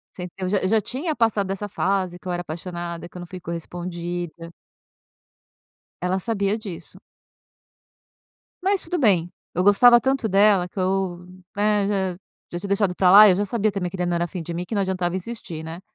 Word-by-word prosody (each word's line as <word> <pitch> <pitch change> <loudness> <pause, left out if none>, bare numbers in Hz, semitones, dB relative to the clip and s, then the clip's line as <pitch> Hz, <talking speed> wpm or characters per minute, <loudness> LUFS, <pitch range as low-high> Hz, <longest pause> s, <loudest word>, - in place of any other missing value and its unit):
Você 180 - -7
entendeu, 180 +1 -7
eu - - -1
já 200 +2 +2
eu 185 - -1
já 220 +1 +3
tinha 290 - -3
passado 215 -4 +1
essa 200 +1 -3
fase, 185 -3 -1
que 185 - -9
eu - - -1
era 175 0 -2
apaixonada, 170 +1 -6
que - - -16
eu - - -6
não 175 - -8
fui 185 +1 -9
correspondida. 170 0 -6 1.5
Ela 180 +2 0
sabia 200 0 -1
disso. 195 -6 -9 1.6
Mas 390 0 +1
tudo 355 - -1
bem, 185 - +3 0.2
eu 180 - +1
gostava 240 +5 +7
tanto 265 -3 0
dela, 195 -2 +4
que 195 - -10
eu, 185 -1 -1 0.3
né, 205 -1 +2
já 190 -3 -1 0.4
já 175 - -3
tinha 200 - -6
deixado 200 -2 +1
pra 180 0 +4
lá, 210 +3 +10
eu 185 - +5
já 205 - 0
sabia 215 0 0
também 180 -3 -3
que 190 - -6
ele 180 0 -1
não 175 - 0
era 170 0 -1
fim 180 +1 -6
de 170 +1 -6
mim, 175 +1 -3
que 220 - -6
não 200 - +2
adiantava 185 -2 -1
insistir, 180 -5 -7
né. 165 +2 -7
185 Hz, 205 wpm, -23 LUFS, 175-205 Hz, 1.6 s, lá